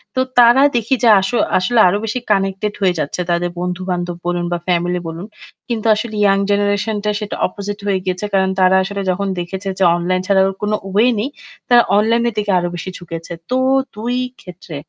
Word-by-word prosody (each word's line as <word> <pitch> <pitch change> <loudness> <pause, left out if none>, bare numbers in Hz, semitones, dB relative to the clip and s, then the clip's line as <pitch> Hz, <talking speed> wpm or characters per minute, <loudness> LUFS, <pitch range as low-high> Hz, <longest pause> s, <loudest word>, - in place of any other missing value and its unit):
তো - - 0 0.2
তারা 240 +2 +7
দেখি 235 +2 +1
যে - - +5
আস 190 0 -2 0.3
আসলে 225 +6 +1
আরো 180 +3 +2
বেশি 225 +3 -2
কানেক্টেড 195 +1 0
হয়ে 180 -2 +2
যাচ্ছে। 150 +5 -2
তাদের 175 +1 0
বন্ধু-বান্ধব 180 -1 -3
বলুন 175 0 -1
বা 175 - 0
ফ্যামিলি 175 0 0
বলুন। 165 +3 -6 0.4
কিন্তু 230 -2 -3
আসলে 215 +1 -5
ইয়াং 195 -1 +4
জেনারেশনটা 205 +1 0
সেটা 210 -1 -5
opposite 205 +2 -7
হয়ে 195 -2 +1
গিয়েছে। 185 +2 -2
কারণ 190 -1 +2
তারা 185 0 +4
আসলে 200 +1 -4
যখন 195 +2 -2
দেখেছে 190 +3 -5
যে 190 - +3
অনলাইন 180 +1 -1
ছাড়া 195 -1 +4
ওর 195 - -2
কোন 210 0 -1 0.2
ওয়ে 215 +5 +3
নে, 210 - -1
ই - - -8 0.4
তারা 240 -1 +7 0.2
অনলাইনের 230 +2 +2
দিকে 210 -1 0
আরও 175 0 -2
বেশি 175 +2 -6
ঝুঁকেছে। 165 -1 -8 0.2
তো 255 - +1 0.4
২ 235 +4 -3 0.3
ক্ষেত্রে 180 -2 -10
195 Hz, 190 wpm, -17 LUFS, 180-210 Hz, 0.4 s, তারা